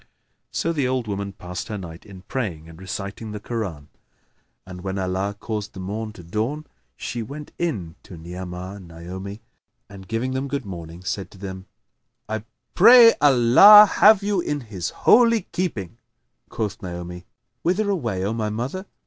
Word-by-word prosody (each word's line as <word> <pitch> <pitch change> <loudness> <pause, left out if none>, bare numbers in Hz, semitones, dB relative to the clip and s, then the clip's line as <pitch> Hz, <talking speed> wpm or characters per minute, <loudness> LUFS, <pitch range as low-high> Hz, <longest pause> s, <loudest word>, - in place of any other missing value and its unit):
So 165 - -1
the 145 -5 0
old 130 -3 -1
woman 100 -1 -3
passed 90 -2 -7
her 105 - -4
night 85 -2 -10
in 95 -2 -12
praying 95 - -4
and 80 +2 -13
reciting 100 +3 -6
the 105 - -5
Koran; 95 -11 -5 0.8
and 90 -1 -9
when 95 +1 -4
Allah 95 +2 -2
caused 105 -2 -4
the 95 - -9
morn 105 +4 -4
to 90 - -12
dawn, 115 - -3 0.3
she 120 - -4
went 145 +6 -8
in 105 - -2
to 90 - -12
Ni'amah 90 +3 -7
and 95 -3 -12
Naomi 95 +5 -8 0.5
and, 95 -2 -12
giving 115 +3 -2
them 130 +1 -2
good 140 -3 -3
morning, 85 -2 -8
said 95 0 -3
to - - -16
them, 95 -1 -8 0.6
"I 110 0 -3 0.3
pray 230 +3 +9
Allah 145 - +9
have 210 -1 +7
you 200 -3 +1
in 145 -3 -2
His 100 -7 -5
holy 230 -2 +4
keeping!" 115 - -3 0.5
Quoth 105 -2 -4
Naomi, 90 -1 -7 0.4
"Whither 190 +5 +1
away, 120 - -1
O 105 - -1
my 110 -2 -2
mother? 130 - -4
105 Hz, 165 wpm, -23 LUFS, 95-130 Hz, 0.8 s, pray